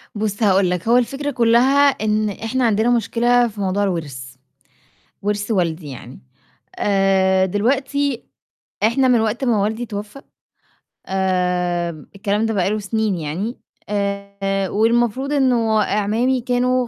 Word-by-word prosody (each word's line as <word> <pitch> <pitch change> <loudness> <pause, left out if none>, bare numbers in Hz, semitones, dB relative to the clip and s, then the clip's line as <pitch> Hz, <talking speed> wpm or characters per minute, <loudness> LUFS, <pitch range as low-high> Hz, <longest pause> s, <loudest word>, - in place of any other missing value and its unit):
بُصّ 210 +1 -2
هاقول 195 -2 +3
لك، 180 +2 -3
هو 240 +2 +5
الفكرة 275 +4 -1
كلّها 255 +3 +4
إن 215 -4 0
إحنا 225 +5 -2
عندنا 220 +1 +2
مشكلة 240 +1 +2
في 210 -2 -8
موضوع 195 +1 0
الورث، 140 -9 -4 0.9
ورث 205 +1 -2
والدي 170 -6 -1
يعني، 125 - -10 0.6
آآ 190 -1 +2
دلوقتي 265 +6 -1 0.6
إحنا 255 +5 +3
من 245 -2 +4
وقت 225 +4 -1
ما 225 -5 +2
والدي 220 +4 -2
توفى، 210 +4 -7 0.9
آمم 180 -3 -1
الكلام 205 +2 -1
ده 225 - -1
بقى 190 -2 +1
له 215 +1 -1
سنين 215 0 -1
يعني، 175 - -4 0.3
آآ 200 -1 -2
والمفروض 240 +5 +1
إنه 235 -6 +2
أعمامي 225 +6 0
كانوا 250 0 +1
210 Hz, 130 wpm, -20 LUFS, 195-240 Hz, 0.9 s, هو